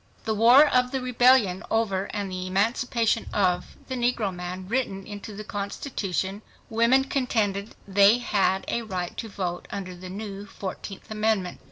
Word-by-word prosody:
The 220 - 0
war 240 +7 +7
of 250 -2 +3
the 265 - -2
rebellion 250 -6 +4
over 200 -4 +1
and 200 -1 -4
the 185 0 -4
emancipation 225 +4 +1
of 180 -3 0
the 260 - -4
negro 240 -5 0
man 180 +1 -6
written 195 -5 -1
into 205 0 -8
the 215 - -6
constitution, 200 -2 -3 0.3
women 235 +4 +4
contended 220 -7 -1
they 200 +3 +6
had 195 -5 +1
a 235 - -1
right 185 -5 -4
to 225 - -5
vote 180 -3 -4
under 185 -2 -5
the 180 +1 -9
new 200 +1 -6
fourteenth 195 +1 -7
amendment. 215 -4 0
205 Hz, 155 wpm, -26 LUFS, 190-235 Hz, 0.3 s, war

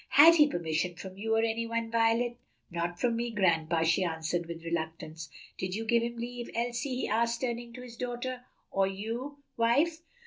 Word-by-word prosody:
"Had 325 +5 +9
he 300 -2 +7
permission 175 - -1
from 185 +1 -8
you 220 +3 0
or 225 - +3
any 230 0 0
one, 230 0 -2
Violet?" 230 +1 +2 0.3
"Not 170 +1 -2
from 235 -2 +2
me, 235 +1 -1
grandpa," 170 -6 +2
she 165 +4 +3
answered 165 0 -1
with 165 0 -7
reluctance. 160 -1 -4 0.3
"Did 185 0 -2
you 225 +1 -3
give 235 +1 +3
him 235 0 -3
leave, 240 0 -5
Elsie?" 240 +3 -1
he - - -1
asked, 230 +2 +1
turning 240 -1 -2
to 250 +1 -8
his 235 -2 -10
daughter. 250 +1 -4 0.3
"Or 195 0 +2
you, 235 +9 -5
wife?" 285 +9 +3
230 Hz, 185 wpm, -30 LUFS, 175-240 Hz, 0.3 s, Had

